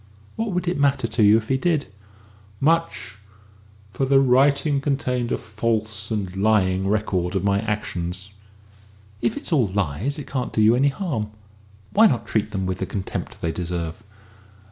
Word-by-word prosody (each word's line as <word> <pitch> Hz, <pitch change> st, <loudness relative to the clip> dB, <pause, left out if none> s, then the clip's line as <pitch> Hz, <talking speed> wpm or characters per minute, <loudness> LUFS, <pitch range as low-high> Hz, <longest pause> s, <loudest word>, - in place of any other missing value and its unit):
"What 225 Hz, -2 st, -2 dB
would 180 Hz, 0 st, -1 dB
it 175 Hz, -3 st, 0 dB
matter 140 Hz, -3 st, +2 dB
to 115 Hz, 0 st, -1 dB
you 105 Hz, +1 st, +7 dB
if 110 Hz, 0 st, -4 dB
he 135 Hz, -, +3 dB
did?" 160 Hz, -2 st, +1 dB, 0.7 s
"Much 160 Hz, -, 0 dB, 0.7 s
for -, -, -2 dB
the 135 Hz, 0 st, +5 dB
writing 140 Hz, +2 st, +3 dB
contained 130 Hz, -4 st, -1 dB
a -, -, +1 dB
false 110 Hz, -1 st, -2 dB
and 100 Hz, -5 st, -3 dB
lying 95 Hz, -2 st, +2 dB
record 95 Hz, -3 st, 0 dB
of 95 Hz, -, 0 dB
my 100 Hz, 0 st, +2 dB
actions." 95 Hz, -3 st, -3 dB, 0.9 s
"If 120 Hz, -, 0 dB
it -, -, -6 dB
is -, -, -6 dB
all 135 Hz, -9 st, +3 dB
lies, 100 Hz, -, -1 dB
it 150 Hz, -, -6 dB
can't 130 Hz, -2 st, -3 dB
do -, -, 0 dB
you 110 Hz, +2 st, +6 dB
any 140 Hz, +3 st, +3 dB
harm. 135 Hz, -, -3 dB, 0.6 s
Why 220 Hz, +2 st, +7 dB
not 115 Hz, -, -1 dB
treat 110 Hz, 0 st, 0 dB
them 95 Hz, -2 st, -3 dB
with 95 Hz, 0 st, -2 dB
the -, -, -2 dB
contempt 95 Hz, -2 st, -5 dB
they 85 Hz, -, +1 dB
deserve?" 85 Hz, +2 st, -4 dB
110 Hz, 170 wpm, -23 LUFS, 100-135 Hz, 0.9 s, you